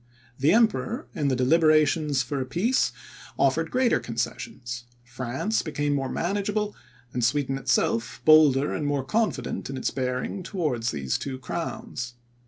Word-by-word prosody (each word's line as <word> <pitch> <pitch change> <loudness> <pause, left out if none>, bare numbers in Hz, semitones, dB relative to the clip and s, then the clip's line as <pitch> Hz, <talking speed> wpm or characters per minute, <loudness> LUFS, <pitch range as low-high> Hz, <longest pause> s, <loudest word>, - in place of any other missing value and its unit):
The 145 +4 +4
Emperor, 230 +3 +2
in 145 - -1
the 135 - +2
deliberations 155 +1 +3
for 135 +2 -3
a - - -2
peace, 220 - +1 0.5
offered - - +2
greater 255 -1 +2
concessions; 120 +1 -4 0.2
France 130 - -2
became 145 -2 -1
more 135 -2 -1
manageable; 205 +5 -1 0.4
and 125 - -1
Sweden 135 +3 +1
itself 120 -3 0
bolder 150 -3 +6
and 150 - -2
more 145 -2 0
confident 215 - -1
in 135 - -4
its - - -1
bearing 125 +8 -2
towards 150 - -1
these 70 -6 -2
two 135 -2 -4
crowns. 130 - -5
145 Hz, 140 wpm, -26 LUFS, 125-175 Hz, 0.5 s, bolder